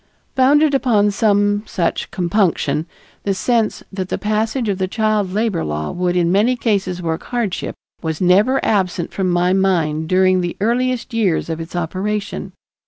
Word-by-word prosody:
Founded 285 +3 +4
upon 220 -7 +3
some 205 0 +2
such 170 -2 -2
compunction, 170 -5 0 0.3
the 195 -1 -1
sense 230 +1 0
that 190 -1 -4
the - - -1
passage 220 +3 -1
of 200 -2 -1
the 190 - 0
child 215 -2 0
labor 210 -3 0
law 75 0 -3
would 180 0 -1
in 175 -1 +2
many 215 +7 +3
cases 195 -6 -1
work 160 0 -2
hardship, 235 -7 -3 0.3
was 160 -2 -3
never 200 +9 +4
absent 185 -5 0
from 190 -2 0
my 175 +1 +2
mind 165 -5 +1
during 185 0 +3
the 175 -1 -4
earliest 245 +3 0
years 195 -7 0
of 160 - -4
its 165 +2 -8
operation. 195 +5 -3
195 Hz, 160 wpm, -19 LUFS, 175-220 Hz, 0.3 s, Founded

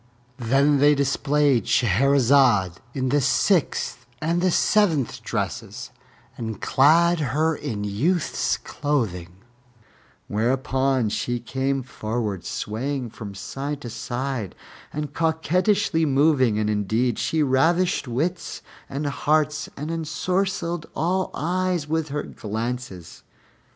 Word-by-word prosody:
Then 135 +4 +3
they 145 +1 +5
displayed 140 -1 +2
Shahrazad 125 -4 +3 0.2
in 130 -1 0
the 145 +2 +2
sixth 135 -6 +1
and 170 +4 0
seventh 170 - +2
dresses - - -4 0.4
and 110 -4 -5
clad 165 +5 +4
her 155 +3 +1
in 105 -7 -4
youth's 140 - 0
clothing, 100 - -2 0.9
whereupon 130 +2 +1
she 120 +3 -2
came 135 +2 -2
forward 110 -5 -3
swaying 125 +3 -3
from 100 -4 -8
side 135 +9 -5
to 120 - -7
side, 120 -2 -4 0.4
and 150 0 -4
coquettishly 165 +1 +1
moving, 135 -5 +3
and 105 0 0
indeed 110 +3 0
she 150 +6 +1
ravished 160 +5 +2
wits 160 +9 -3 0.3
and 140 +2 -3
hearts 150 +1 0
and 150 +3 -4
ensorcelled 170 +1 -2
all 185 +3 0
eyes 180 -1 -1
with 160 0 -1
her 145 +1 -2
glances. 110 -4 -5
140 Hz, 105 wpm, -24 LUFS, 120-160 Hz, 0.9 s, they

